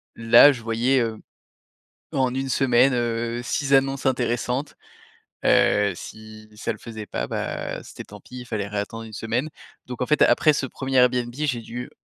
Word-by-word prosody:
Là, 115 +5 +7
je 120 - -9
voyais, 115 +4 +1
heu, 110 -1 -2 0.9
en 130 -2 0
1 135 0 -2
semaine, 130 0 +3
heu, 120 0 -1
6 135 +3 -2
annonces 135 0 +2
intéressantes, 125 +2 -1 0.7
heu, 100 -1 +3
si 110 +3 -11
ça - - -3
le - - -12
faisait 110 -2 -8
pas, - - -4
bah, - - -4
c'était - - -10
tant - - -13
pis, 125 0 -10
fallait 105 -3 -3
réattendre 105 +2 -4
1 110 - -11
semaine. 115 +8 -2 0.3
Donc 125 -1 -8
en 125 - 0
fait, 150 - +3
après 155 - +4
ce 140 - -1
1er 135 +1 -4
Airbnb, 125 -1 +3
j'ai 135 -5 -2
dû 120 +2 -7
120 Hz, 170 wpm, -23 LUFS, 115-135 Hz, 0.9 s, Là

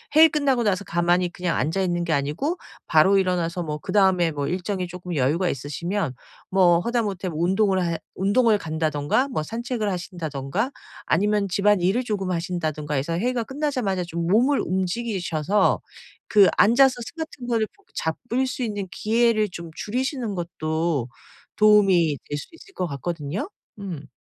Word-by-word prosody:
회의 320 +1 +9
끝나고 280 -6 +1
나서 200 -2 +1
가만히 175 +1 +1
그냥 180 -2 -2
앉아있는 175 +1 0
게 165 - 0
아니고 150 - -1 0.3
바로 190 +5 +5
일어나서 180 -2 0
뭐 150 -2 -3
그다음에 185 -4 +2
뭐 145 -1 -3
일정이 185 0 -2
쪼끔 180 -1 -6
여유가 150 +7 +1
있으시면 150 +2 -3 0.4
뭐 175 -3 +5
하다못해 205 -4 -1
뭐 155 - -5
운동을 190 0 +2
해 170 -1 -1 0.2
운동을 210 +3 +3
간다든가 155 - 0
뭐 155 - -2
산책을 235 +4 -3
하신다든가 175 - -3 0.3
아니면 205 +2 +2
집안일을 200 +3 +2
조금 200 -5 -2
하신다든가 160 -4 -2
해서 145 +5 -1
회의가 245 +1 0
끝나자마자 255 -9 -1
좀 170 -1 -4
몸을 245 +9 +3
움직이셔서 190 -2 0 0.5
그 205 -3 +6
앉아서 255 +4 +6
스마트폰을 245 -8 -3
붙 405 -1 -30
잡을 240 +10 -1
수 255 0 -3
있는 205 -4 -3
기회를 220 -1 +2
좀 170 -1 -7
줄이시는 250 0 -2
것도 160 -5 -2 0.5
도움이 195 -8 +5
될 145 - -2
수도 235 - -11
있을 390 +3 -17
것 180 - -2
같거든요? 155 - -4 0.3
음. 175 -7 -6
185 Hz, 350 characters per minute, -24 LUFS, 170-220 Hz, 0.5 s, 회의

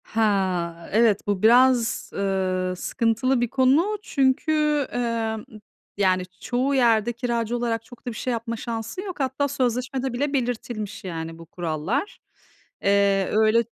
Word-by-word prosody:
He, 225 - -2 0.7
evet, 220 -2 +3
bu 200 -2 0
biraz, 245 0 +4
ııı, 185 -2 -1
sıkıntılı 230 +6 0
bir 240 - +2
konu. 285 - +3
Çünkü, 300 -1 +1
emm, 230 -2 -2 0.5
yani 185 -2 +2 0.2
çoğu 255 +3 0
yerde 235 -2 +3
kiracı 235 -1 -1
olarak 230 -1 -1
çok 245 - -15
da - - +1
bir - - -9
şey 250 - -2
yapma 230 0 -3
şansın 230 +9 -5
yok. 375 -5 -7
Hatta 265 +1 0
sözleşmede 255 0 -1
bile 280 +4 -1
belirtilmiş 240 -5 -3
yani 165 -3 -5
bu 165 - -11
kurallar. 175 - -3 0.6
Eee, 200 -1 +3
öyle 220 +2 +4
235 Hz, 135 wpm, -24 LUFS, 205-260 Hz, 0.7 s, biraz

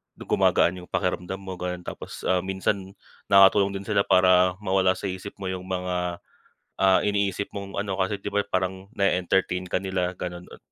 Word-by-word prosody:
gumagaan 90 +1 +2
yung 90 - -12
pakiramdam 90 0 -2
mo 95 -2 -8
gano'n. 90 0 -4
Tapos, - - -8
ah, 95 - +2
minsan 95 +1 -2 0.3
nakatulong 100 0 +5
din 95 - -5
sila 100 -1 +1
para 90 0 +5
mawala 95 -1 +2
sa - - -11
isip 95 +2 -8
mo 95 -2 -4
yung 95 0 -6
mga, 90 -1 -2 0.7
ah, 95 -1 +6
iniisip 100 -1 0
mong 100 -1 -6
ano, 100 -1 -2
kasi 95 +1 -1
'di - - -13
ba 105 - +3
parang 95 +1 -2
nae-entertain 90 -1 +1
ka - - +1
nila, 90 -1 -2
gano'n. 90 0 -6
Ah - - -12
95 Hz, 175 wpm, -25 LUFS, 90-100 Hz, 0.7 s, ah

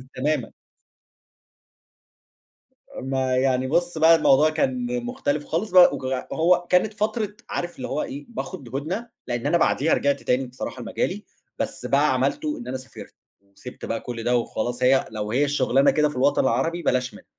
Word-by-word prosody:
تمامًا. 150 +4 -1 2.5
ما 130 -1 -1
يعني 130 0 +1
بُص 175 +2 0
بقى 165 +1 +7
الموضوع 155 -1 +4
كان 245 - -1
مُختلف 275 +3 -2
خالص 220 -5 -2
بق 180 -1 +7
وك - - -6 0.3
وهو 175 +2 +2
كانت 185 +4 +3
فترة 210 0 -2
عارف 175 0 -4
اللي 130 - -5
هو 150 - -2
إيه 140 +2 -7
باخد 140 - -7
هُدنة، 185 +12 -3 0.2
لإن 120 -1 -3
أنا 170 - +3
بعديها 160 -1 +2
رجعت 140 0 +1
تاني 130 +1 0
بصراحة 125 0 -7
لمجالي، 205 - -3 0.3
بس - - -4
بقى - - +3
عملتُه 300 0 -1
إن 245 - -9
أنا 130 - -3
سافرت، 130 +1 -12 0.4
سِبت 125 - -9
بقى 115 - -2
كُلّ 115 -2 -6
ده 125 0 +2
وخلاص 120 +2 -3
هي 130 +1 +4
لو 105 -1 -4
هي 140 +4 +2
الشُغلانة 135 -1 +3
كده 150 -1 +2
في 150 - -9
الوطن 135 +3 +3
العربي 135 +8 0
بلاش 125 -3 0
منها. - - -14
145 Hz, 165 wpm, -24 LUFS, 130-185 Hz, 2.5 s, بقى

